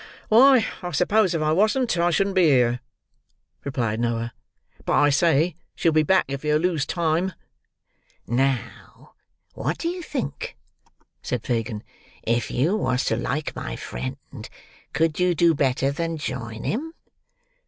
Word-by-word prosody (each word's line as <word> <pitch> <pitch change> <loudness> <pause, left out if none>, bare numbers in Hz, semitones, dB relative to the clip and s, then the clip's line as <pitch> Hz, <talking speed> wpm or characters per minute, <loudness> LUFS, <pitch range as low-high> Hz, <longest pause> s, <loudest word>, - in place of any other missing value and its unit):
"Why, 250 +1 +6 0.2
I 180 - -4
suppose 185 +2 +2
if 155 - 0
I 155 - +2
wasn't, 215 +8 +2
I 170 0 +2
shouldn't 195 +3 +1
be 185 -2 +5
here," 125 -4 +3 0.8
replied 120 -5 -2
Noah. 115 0 -1 0.5
"But, - - -1
I 145 0 +4
say, 165 +3 +3 0.2
she'll 165 - +2
be 155 0 +4
back 185 +5 +3
if 140 +1 -5
yer 150 0 +2
lose 165 -3 0
time." 170 +2 0 0.9
"Now, 130 +1 -2 0.4
what - - -2
do 335 - -2
you 355 +1 -5
think?" 250 - -5 0.6
said 125 -3 -3
Fagin. 115 -3 -2 0.4
"If 115 0 0
you 155 +11 +1
was 130 -10 0
to - - +1
like 150 +3 -3
my - - -5
friend, 65 +2 -7 0.4
could 160 0 0
you 180 -1 +2
do 170 +1 +4
better 135 -2 +1
than 165 +2 -3
join 115 -6 -5
him?" 320 +9 -3
155 Hz, 145 wpm, -24 LUFS, 125-180 Hz, 0.9 s, Why